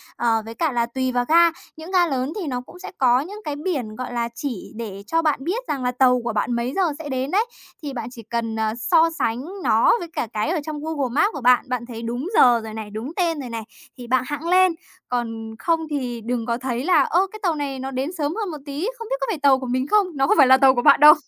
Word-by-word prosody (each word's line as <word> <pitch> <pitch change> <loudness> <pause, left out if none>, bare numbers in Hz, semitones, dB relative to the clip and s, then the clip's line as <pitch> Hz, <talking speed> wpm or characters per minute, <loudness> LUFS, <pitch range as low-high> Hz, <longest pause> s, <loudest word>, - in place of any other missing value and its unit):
Ờ, 225 -2 +1
với 225 - -7
cả 320 +1 0
là 235 -2 +1
tùy 260 +2 -2
vào 245 0 0
ga, 335 +1 +6 0.3
những 320 +3 -9
ga 360 -2 +4
lớn 265 0 -2
thì 345 - -4
nó 250 -2 -2
cũng 360 - -15
sẽ 370 - -8
có 250 -1 +4
những 400 +9 -7
cái 295 - -3
biển, 285 - -3
gọi 250 +1 -6
là, 235 -1 -1
chỉ 245 -7 -5
để 205 -4 -7
cho 330 +7 +1
bạn 310 -3 +1
biết 435 - -3
rằng 275 -3 -2
là 250 - +1
tàu 250 0 +3
của 235 - -2
bạn 215 +3 0
mấy 235 +3 -2
giờ 390 - +2 0.2
sẽ 295 -2 -6
đến 260 +2 -2
đấy, 420 +4 +2 0.4
thì 285 -2 -4
bạn 235 -2 -5
chỉ 230 -3 -10
cần, 230 0 -3
à, 220 0 0
so 325 +8 +3
sánh 225 - +1 0.3
nó - - +4
với 345 - -6
cả - - -2
cái 215 +8 -1
ở 340 -2 0
trong 310 -2 -5
Google 295 -5 -2
Maps 400 - +3
của 285 - -6
bạn, 250 +1 +4
bạn 250 -2 -2
thấy 230 -2 -8
đúng 240 +6 -3
giờ 240 -2 +6
rồi 220 -1 -7
này, 220 -1 -6
đúng 220 +8 -6
tên 335 -4 0
rồi 250 - -7
này, 230 -1 -5 0.3
thì 245 - -9
bạn 255 +1 +2
hẵng 295 +3 -4
lên, 370 -1 +4 0.3
còn 225 -2 -3
không 330 -1 +1
thì 250 -5 -3
đừng 235 0 -2
có 235 0 -1
thấy 245 -1 -3
là: 335 -6 +5
"Ơ, 365 +7 +2
cái 430 - -9
tàu 345 -4 +1
này 280 -3 -4
nó 265 +1 -5
đến 270 +5 -2
sớm 300 +3 -1
hơn 420 -5 -3
một 305 - -6
tí, 290 +8 -3
không 460 - -7
biết - - +1
có - - -1
phải 380 -8 -2
tàu 275 -2 +4
của 260 - -6
mình 255 +2 -1
không?" 415 +1 +3
Nó 270 0 +2
không - - +3
phải 275 -3 +7
là 260 - +7
tàu 265 -1 +5
của 245 - +1
bạn - - +6
đâu. 300 +1 +10
260 Hz, 280 wpm, -22 LUFS, 240-320 Hz, 0.4 s, đâu